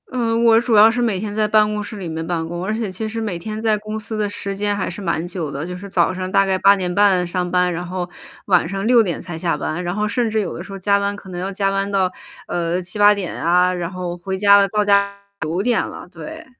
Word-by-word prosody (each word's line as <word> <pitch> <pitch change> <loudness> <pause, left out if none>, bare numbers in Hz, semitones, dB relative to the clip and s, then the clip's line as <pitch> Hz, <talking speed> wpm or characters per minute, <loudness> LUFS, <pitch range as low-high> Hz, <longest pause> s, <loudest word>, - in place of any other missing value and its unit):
嗯， 230 -2 0
我 225 -1 +6
主 235 -1 +1
要 215 +2 +8
是 245 +1 -1
每 220 -6 0
天 205 +1 -4
在 215 0 +1
办 215 0 +4
公 210 0 -2
室 210 +1 -7
里 185 -4 -5
面 160 0 -4
办 165 -1 -2
公， 175 +2 -5
而 215 - -1
且 220 -4 -3
其 220 +4 -4
实 225 +1 -4
每 200 -6 -3
天 215 +4 -5
在 220 -1 +2
公 215 +1 -6
司 215 0 -5
的 210 -1 0
时 200 -1 -5
间 205 0 0
还 195 - -2
是 185 +3 -7
蛮 170 -3 -1
久 175 -4 -4
的， 140 +2 -5
就 180 +1 -6
是 200 +2 -9
早 185 -1 +2
上 185 0 -4
大 195 +1 +3
概 190 -1 +1
8:30 190 -1 +3
上 180 0 -2
班。 180 0 +2
然 175 +1 -4
后 180 0 -4 0.4
晚 180 -4 +3
上 195 +3 -3
6:00 225 -7 +3
才 175 -3 -7
下 165 0 0
班， 165 +3 -3
然 175 +1 -3
后 210 +1 0
甚 230 +2 0
至 220 0 0
有 200 - -4
的 170 - -6
时 195 - -12
候 - - -5
加 200 +1 +2
班 200 0 -1
可 200 -1 -12
能 175 -1 -6
要 185 +2 -3
加 195 0 0
班 195 0 -1
到， 190 -2 +1 0.4
呃， 175 +1 -1
7-8 205 +3 +4
点 200 -4 -4
啊， 180 +2 +3
然 175 -2 -3
后 180 -1 -5
回 190 +2 -4
家 200 +1 +6
了 200 0 +4
到 210 +1 0
家 205 0 +5 0.4
9:00 190 +10 0
了， - - -9
对。 320 +1 -9
195 Hz, 270 characters per minute, -20 LUFS, 180-210 Hz, 0.4 s, 要